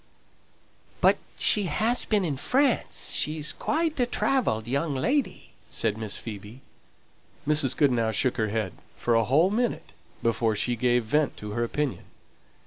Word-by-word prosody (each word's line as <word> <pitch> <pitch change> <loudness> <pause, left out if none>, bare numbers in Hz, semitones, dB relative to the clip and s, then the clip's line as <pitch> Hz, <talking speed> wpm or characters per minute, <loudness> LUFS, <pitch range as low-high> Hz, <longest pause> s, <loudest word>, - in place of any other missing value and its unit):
"But - - +4 0.2
she 205 -2 +5
has 220 +9 +1
been 210 -4 +1
in 150 -4 -2
France; 260 - 0
she's 155 0 0
quite 315 -1 -1
a 245 - +2
travelled 225 - 0
young 140 +3 -1
lady," 265 - -1 0.2
said 105 - -1
Miss 110 -2 -3
Phoebe. 110 +3 -9 0.9
Mrs. 150 -4 +4
Goodenough 120 -6 +2
shook 125 +3 0
her 110 -2 0
head 105 -3 -2 0.2
for 120 - 0
a 115 0 +3
whole 155 - +3
minute 240 +3 -2 0.3
before 115 -1 +1
she 120 +4 -1
gave 120 +1 +1
vent 150 +7 0
to 105 0 -7
her 120 +3 -1
opinion. 140 +3 -3
135 Hz, 145 wpm, -26 LUFS, -, 0.9 s, she